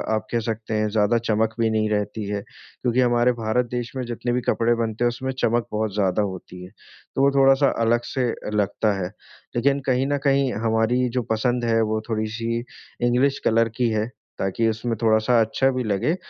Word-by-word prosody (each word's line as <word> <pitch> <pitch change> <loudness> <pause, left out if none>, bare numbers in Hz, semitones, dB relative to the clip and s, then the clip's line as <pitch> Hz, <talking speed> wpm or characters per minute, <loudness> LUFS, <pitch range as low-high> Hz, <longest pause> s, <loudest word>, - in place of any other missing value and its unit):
आप 110 - -3
कह 120 - +1
सकते 110 0 -3
हैं 105 0 +1
ज़्यादा 110 +2 +2
चमक 110 +1 +2
भी 115 -1 +3
नहीं 110 -1 +1
रहती 105 0 -2
है, 100 -1 -2
क्योंकि 125 +4 -4
हमारे 120 0 +3
भारत 110 +3 +1
देश 120 -1 -3
में 130 - -2
जितने 120 +1 -3
भी 125 - 0
कपड़े 120 +1 +2
बनते 115 0 -2
हैं 120 - +4
उसमें 130 +2 -4
चमक 120 +1 +1
बहुत 105 -1 -1
ज़्यादा 100 -1 +1
होती 95 -2 -6
है, 90 - -10 0.5
तो - - +1
वो 140 0 +5
थोड़ा-सा 135 +1 +5 0.2
अलग 120 +1 +3
से 125 -3 +1 0.3
लगता 105 +1 +1
है। 90 - -1 0.5
लेकिन 140 +3 +2
कहीं 130 +1 +2
न 145 0 +1
कहीं 135 -2 +2
हमारी 115 +3 +1
जो 125 +1 -1
पसंद 120 +2 0
है 115 -1 +2
वो 110 0 0
थोड़ी-सी 115 +1 -2 0.4
इंग्लिश 135 +3 +2
कलर 115 0 +3
की 125 -2 +2
है, 110 -1 0 0.3
ताकि 95 +4 0
उसमें 115 +1 -2
थोड़ा-सा 110 +1 +3
अच्छा 120 +4 +2
भी 130 -1 -2
लगे 110 - 0
115 Hz, 195 wpm, -23 LUFS, 110-125 Hz, 0.5 s, वो